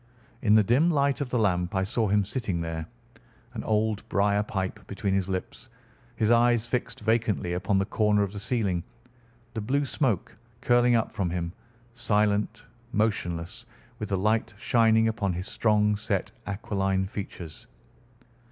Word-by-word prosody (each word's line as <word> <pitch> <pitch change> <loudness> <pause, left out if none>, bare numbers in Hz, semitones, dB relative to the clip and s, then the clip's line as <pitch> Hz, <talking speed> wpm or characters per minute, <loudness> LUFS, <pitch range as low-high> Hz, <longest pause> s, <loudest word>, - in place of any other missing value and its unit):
In 105 -1 +4
the 110 - +6
dim 130 - +3
light 140 -3 +1
of 140 - -2
the 125 - 0
lamp 90 -4 +1
I 95 - +2
saw 110 +3 0
him 100 0 +2
sitting 105 -5 -2
there, 80 -1 -4 0.7
an 115 - -5
old 110 -1 +1
briar 100 +1 +2
pipe 95 -3 -3
between 100 -1 -2
his 95 -1 0
lips, 95 -1 -5 0.5
his 110 +1 +2
eyes 120 -1 +4
fixed 120 -1 -3
vacantly 110 -5 +1
upon 95 +3 +1
the 95 - +2
corner 105 -1 +2
of 100 0 -4
the 100 - -5
ceiling, 100 -6 0 0.7
the 110 - -3
blue 140 +7 0
smoke 125 - -1 0.2
curling 120 0 +4
up 115 - +1
from 100 -6 -1
him, 85 0 -3 0.4
silent, 105 -1 +1 0.3
motionless, 100 0 -1 0.3
with 105 - -4
the 100 - +1
light 110 +2 0
shining 110 0 +3
upon 105 -4 0
his 90 +3 -4
strong 105 -1 +2
set 105 - -2 0.2
aquiline 95 -1 -1
features. 95 -5 -7
105 Hz, 155 wpm, -27 LUFS, 95-115 Hz, 0.7 s, the